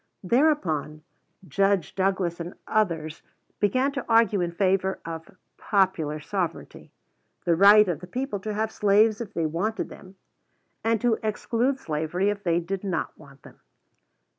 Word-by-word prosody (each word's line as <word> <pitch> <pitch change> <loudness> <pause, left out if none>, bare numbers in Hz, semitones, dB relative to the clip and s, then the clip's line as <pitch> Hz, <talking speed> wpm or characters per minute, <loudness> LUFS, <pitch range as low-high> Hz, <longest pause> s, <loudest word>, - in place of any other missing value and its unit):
Thereupon 180 - +1 0.4
Judge 195 -5 +1
Douglas 190 -3 0
and 170 +1 -6
others 165 -7 -1 0.4
began 255 +7 +2
to 275 -1 -5
argue 225 -4 +4
in 175 -1 -1
favor 190 +1 0
of 165 +2 -8 0.2
"Popular 180 -7 +1
Sovereignty," 180 +2 -5 0.5
the 170 -2 +3
right 205 +3 +7
of 175 -5 -2
the 180 - -10
people 250 +1 -3
to 210 +2 -4
have 220 +1 -1
slaves 210 +2 +3
if 225 - -8
they 165 - 0
wanted 190 +8 -2
them, 190 0 -13 0.7
and 225 0 +1
to 240 -2 +2
exclude 230 +4 -1
slavery 160 - -1
if 205 0 -6
they 170 -2 +2
did 190 +3 -4
not 190 -3 -3
want 140 -3 -17
them. - - -16
195 Hz, 145 wpm, -25 LUFS, 170-215 Hz, 0.7 s, right